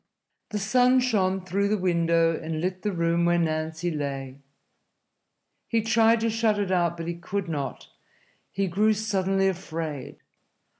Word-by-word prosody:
The 210 - -3
sun 250 +5 +3
shone 195 -7 +1
through 200 +2 0
the 210 +1 +1
window 170 -2 +2
and 160 0 -4
lit 185 +2 -2
the 210 - -1
room 170 -1 +1
where 175 0 +3
Nancy 160 +1 -1
lay. 140 -3 -4 1.3
He 225 -2 +1
tried 225 0 +4
to 230 - +1
shut 220 -1 +1
it 200 -2 -1
out, 170 -2 +1
but 165 0 -5
he 170 - -1
could 185 +3 -4
not. 140 -5 -4 0.6
He 195 0 -1
grew 205 +5 +2
suddenly 195 -2 0
afraid. 160 -6 -4
185 Hz, 150 wpm, -26 LUFS, 165-210 Hz, 1.3 s, tried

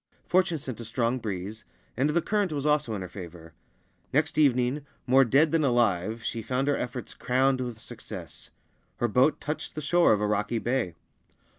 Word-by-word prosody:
Fortune 185 -2 +2
sent 130 -5 -6
a - - -5
strong 115 +2 -1
breeze, 105 0 -5 0.3
and 135 +5 +1
the 165 +2 +1
current 205 -4 0
also 145 -2 -3
was 150 -1 +2
in 105 -4 -3
her - - -6
favour. 85 -3 -10 0.6
Next 155 +3 +1
evening, 130 0 +3 0.2
more 135 +1 +6
dead 140 +5 +3
than 165 -2 +2
alive, 115 -4 +1
she 115 - -3
found 130 +5 -1
her 145 - +3
efforts 125 0 -5
crowned 130 +1 +1
with 120 -3 -4
success. - - -8 0.5
Her 120 - +1
boat 125 +7 +3
touched 150 +2 -5
the - - -3
shore 175 +4 +4
of 105 - +3
a 105 - 0
rocky 105 +2 0
bay. 115 -7 -1
125 Hz, 180 wpm, -27 LUFS, 110-145 Hz, 0.6 s, more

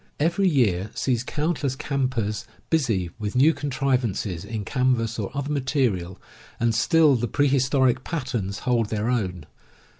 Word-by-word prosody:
Every 170 +6 +2
year 105 - +1
sees 125 -3 0
count 150 +5 -2
less 135 -3 -1
campers 130 -7 -2 0.2
busy 115 - +1
with 105 +1 -4
new 145 +6 +5
contrivances 130 - -1
in 105 0 -5
canvas 125 -3 0
or 100 - -2
other 140 +1 -2
material 125 - -1 0.2
— 110 +1 -23
and 115 -1 +2
still 150 +5 +4
the 120 0 -1
prehistoric 130 -1 +2
patterns 120 - -3
hold 120 -4 +1
their 110 +2 -1
own. 90 -9 -2
125 Hz, 145 wpm, -24 LUFS, 105-140 Hz, 0.2 s, new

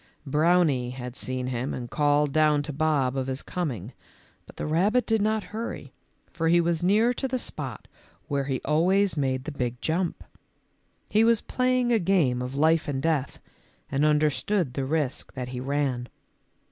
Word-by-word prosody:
Browny 150 -3 +2
had 125 -1 -7
seen 130 -1 -3
him 125 +1 -2
and 120 -1 -5
called 145 +1 +2
down 150 -2 +3
to 150 - -6
Bob 140 -3 +1
of 135 -1 -2
his 130 0 -3
coming, 155 -10 -4 0.5
but - - -14
the - - -4
rabbit 195 +11 +2
did 225 -2 +2
not 215 0 +1
hurry, 225 +2 -5 0.4
for 165 -1 -1
he 170 +1 +5
was 170 -1 +1
near 215 +7 +3
to 265 - -2
the 260 0 -1
spot - - -6 0.4
where 140 -3 -1
he 135 -2 -1
always 185 +7 +3
made 130 -3 -1
the 155 - -5
big 125 -3 -3
jump. 170 +4 -1 0.8
He 215 +1 +3
was 230 -1 +4
playing 255 -1 +1
a 230 - +4
game 165 -10 +2
of 125 +2 -5
life 160 +2 +3
and 140 -2 -1
death 150 -3 -1 0.5
and 140 +1 +1
understood 150 +2 +1
the 135 0 -2
risk 145 -2 -2
that 125 -2 -5
he 125 -1 -5
ran. 130 -2 -1
150 Hz, 170 wpm, -26 LUFS, 130-180 Hz, 0.8 s, he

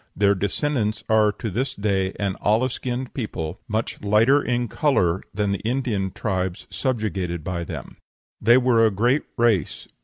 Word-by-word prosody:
Their 100 0 +4
descendants 105 +2 -1
are 110 -1 +4
to 110 - -5
this 130 +8 -2
day 95 -2 0
an 100 -2 -1
olive 115 +5 +2
skinned 125 0 -4
people, 90 - -4
much 110 +1 -3
lighter 110 +8 +4
in 120 -2 -1
color 95 - +1
than 105 -1 -1
the 100 - -1
Indian 115 -5 -1
tribes 95 -3 -3
subjugated 100 - -2
by 85 0 -3
them. - - -8 0.4
They 120 +3 +6
were 125 -3 +4
a 110 - +5
great 120 +8 +2 0.2
race. 115 -5 +1
105 Hz, 155 wpm, -23 LUFS, 95-120 Hz, 0.4 s, They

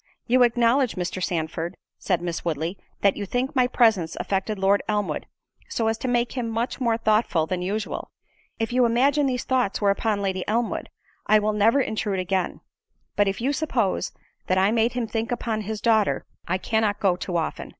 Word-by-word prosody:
"You 255 +2 +3
acknowledge 240 +1 +3
Mr. 185 0 -3
Sandford," 165 0 -2 0.2
said 180 -3 0
Miss 170 -1 -3
Woodley, 165 +2 -2 0.3
"that 200 -1 +4
you 200 - -5
think 250 +6 -1
my 255 -1 +4
presence 220 -10 +2
affected 200 +2 -1
Lord 195 +1 +3
Elmwood, 210 -1 -1 0.4
so 230 - -1
as 225 0 0
to - - -3
make 240 -1 +1
him 245 -3 -3
much 230 +4 -2
more 230 -2 +2
thoughtful 215 -7 +2
than 180 +2 -3
usual; 205 +4 -3 0.5
if 225 +1 -2
you 250 0 +4
imagine 275 +5 +3
these 250 -2 -1
thoughts 250 -6 0
were 200 -1 +3
upon 205 0 0
Lady 190 -1 -1
Elmwood, 230 +2 -1 0.4
I 215 - +6
will 215 0 +1
never 220 +6 +4
intrude 215 -5 -1
again; 185 0 -1 0.5
but 205 -1 +3
if 195 - -1
you 270 +4 +1
suppose 260 - 0 0.4
that 185 - +2
I 190 +2 +4
made 230 +1 +2
him 245 -2 -1
think 225 +1 -3
upon 230 -2 -2
his 215 +1 -4
daughter, 220 -2 +2 0.2
I 185 - +1
cannot 215 +1 0
go 190 -3 +3
too 180 -1 -3
often." 165 - -3
215 Hz, 190 wpm, -24 LUFS, 190-235 Hz, 0.5 s, I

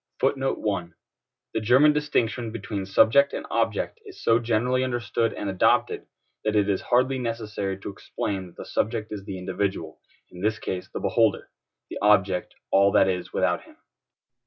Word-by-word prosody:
The 120 -10 0 0.7
German 130 +7 +5
distinction 125 -6 0
between 100 -3 -5
subject 115 +8 +4
and - - -4
object 460 - -1
is 405 -4 -12
so 115 0 +4
generally 120 +2 +1
understood 120 -2 -1
and 105 - -5
adopted, 95 -2 +1 0.4
that 110 0 0
it 105 -1 +3
is 100 -2 0
hardly 130 +2 +2
necessary 105 -5 -3
to - - -5
explain 95 -1 -4
that 85 - -17
the - - -8
subject 110 0 -2
is 100 -2 -6
the 95 - -5
individual, 90 -3 -3 0.3
in 90 - -11
this 110 +2 +1
case 90 -3 -5
the - - -4
beholder; - - +1 0.4
the - - -5
object, 95 -3 +2 0.2
all 100 +1 +5
that - - +5
is 90 -1 -2
without - - +1
him. - - -19
110 Hz, 160 wpm, -25 LUFS, 95-125 Hz, 0.7 s, German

